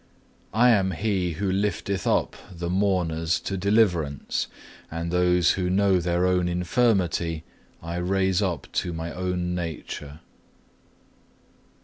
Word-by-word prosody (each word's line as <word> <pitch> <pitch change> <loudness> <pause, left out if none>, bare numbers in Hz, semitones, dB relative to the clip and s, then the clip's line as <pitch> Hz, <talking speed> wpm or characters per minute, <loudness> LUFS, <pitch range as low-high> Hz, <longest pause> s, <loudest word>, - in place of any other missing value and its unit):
I 120 +2 +6
am 95 -4 +2
He 95 -2 -1
who 95 +4 -1
lifteth 100 0 -1
up - - +1 0.2
the 85 -1 -4
mourners 90 -4 +1
to 95 - -3
deliverance, 90 -7 +1 0.4
and 85 +1 -4
those 90 -1 +3
who 90 -2 -1
know 95 0 +3
their 85 +1 +1
own 90 -1 +2
infirmity 90 -3 +1 0.4
I 85 +1 -4
raise 95 +1 +1
up 90 -8 -1
to 90 - -1
my 80 0 -5
own 90 -1 -2
nature." 80 -3 -6
90 Hz, 120 wpm, -25 LUFS, 85-95 Hz, 0.4 s, I